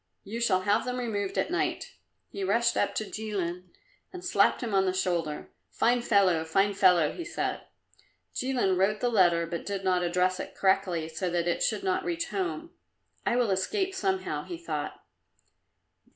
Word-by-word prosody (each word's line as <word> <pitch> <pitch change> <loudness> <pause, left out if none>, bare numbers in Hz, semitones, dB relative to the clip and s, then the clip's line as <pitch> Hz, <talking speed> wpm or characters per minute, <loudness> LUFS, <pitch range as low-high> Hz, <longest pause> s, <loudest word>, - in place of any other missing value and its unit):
You 225 +4 -5
shall 195 -6 +2
have 205 +3 +2
them 250 0 -3
removed 205 -5 -2
at - - 0
night." 360 +2 -2 0.4
He 200 - -4
rushed 235 +5 +2
up - - 0
to 215 - -1
Jilin 185 -5 -4 0.4
and 365 -1 -8
slapped 360 - +3
him 225 -3 -3
on 195 0 +3
the 185 - +1
shoulder. 170 -5 -2 0.2
"Fine 245 +1 +2
fellow! 195 -8 +3
fine 195 +5 +2
fellow!" 180 -5 +4
he 345 - -6
said. 340 - -3 0.7
Jilin 250 -8 0
wrote 210 +3 +2
the 245 - +1
letter, 175 -6 +4
but 170 0 -5
did 200 -1 -4
not 185 -1 +2
address 180 +1 +1
it - - -6
correctly, 190 -4 +1
so 165 +3 -3
that 175 0 -1
it - - 0
should - - 0
not 380 0 0
reach 340 -1 -2
home. 360 -3 -3 0.6
"I - - +2
will 240 -4 +2
escape, 380 - 0
somehow," 380 0 -1
he 345 - -7
thought. 345 - -5
200 Hz, 175 wpm, -28 LUFS, 185-250 Hz, 0.7 s, fellow